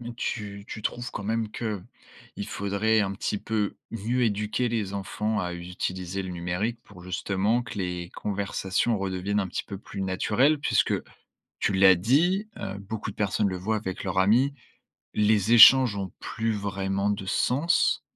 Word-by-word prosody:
tu 100 -4 -4
tu 110 - -7
trouves 120 +3 -3
quand - - -5
même 110 0 -1
qu'il 105 -6 -7
faudrait 100 +2 +1
un 95 -1 -1
petit 100 +1 -2
peu 105 -1 -2 0.2
mieux 115 +3 -1
éduquer 105 +2 0
les 105 -4 -2
enfants 105 +2 -2
à 90 -1 -3
utiliser 90 +1 -4
le 95 - -5
numérique 90 +7 -2
pour 90 -3 -14
justement 100 +5 0
que 115 -3 -8
les 90 -2 -3
conversations 100 +2 -1
redeviennent 95 +1 -1
un 95 - -3
petit - - -4
peu 100 - -6
plus 100 -1 -7
naturelles? 105 +10 +2
Puisque - - +2 0.7
tu 100 - +1
l'as 95 -1 +7
dit, 165 - +2
heu, 95 +1 -5
beaucoup 105 +2 -5
de - - -16
personnes 100 0 +1
le 95 - -3
voient 105 +5 -1
avec 95 -2 -5
leurs 95 -1 0
amis, 120 +9 +4 0.6
les 105 +1 +3
échanges 120 0 +9
ont 95 -2 -4
plus 115 0 -2
vraiment 100 -1 -1
de 100 -2 -2
sens. 140 - +2
100 Hz, 160 wpm, -26 LUFS, 95-110 Hz, 0.7 s, échanges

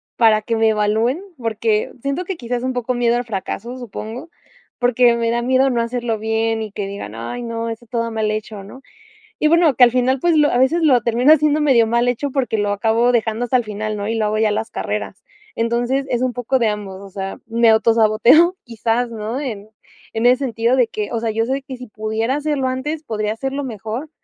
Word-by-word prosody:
para 220 -2 +4
que 230 +2 -2
me 225 0 +3
evalúen, 220 - +1 0.2
porque 220 -2 -1
siento 280 +7 -2
que 370 -1 -4
quizás 245 -1 -3
es - - -8
un 260 0 -1
poco 250 0 -2
miedo 240 0 +1
al 245 - -3
fracaso, 230 +3 -5
supongo. 240 +5 -7 0.5
Porque 245 -1 +4
me 230 0 0
da 235 - 0
miedo 260 +2 +3
no 235 -1 +1
hacerlo 235 -1 -2
bien 225 +1 -1
y 215 - -5
que 200 -1 -4
digan: 195 - -7
"Ay, 115 - -5
no, 230 0 -4
está 230 +1 -7
todo 230 -1 -2
mal 215 -1 -1
hecho", 215 -1 -5
¿no?, 255 +7 -12 0.6
y 305 - +3
bueno, 335 -4 +4
que 255 - +2
al 240 - +4
final, 255 +2 +1
pues 340 0 +2
lo 295 -1 +4
a - - +1
veces 310 +7 +2
lo 270 -6 +5
termino 245 +5 +4
haciendo 305 0 +3
medio 265 -6 +4
mal 235 +2 +1
hecho 260 +3 -1
porque 250 -5 -1
lo 205 0 0
acabo 225 +4 +2
dejando 225 0 0
hasta 250 +1 +1
el 240 - -2
final, 215 0 -4
¿no? 205 0 -4
Y 225 - -1
lo 220 -1 0
hago 215 +1 -1
ya 220 0 +3
en 210 - 0
las 225 - -3
carreras. - - -4 0.4
Entonces 240 +4 0
es 240 0 0
un 255 -1 0
poco 245 +2 0
de 230 - +3
ambos. 200 -2 -5
O 200 - -11
sea, 195 0 -5
me 230 0 +2
autosaboteo, 230 - +4
quizás, 235 +1 -1
¿no?, 225 +3 -4
en 215 -7 -6 0.4
en 225 +2 +1
ese 250 +1 +6
sentido 235 +1 +1
de 250 -3 +4
que, 210 -2 -4
o 230 - -1
sea, 225 -1 -1
yo 225 +1 0
sé 270 +2 -2
que 265 -2 -8
si 250 0 -10
pudiera 220 +4 -2
hacerlo 295 -3 -1
antes, 295 +5 -3
podría 215 -3 -2
hacerlo 270 +5 -4
mejor, 230 +4 -6
235 Hz, 230 wpm, -19 LUFS, 220-255 Hz, 0.6 s, ese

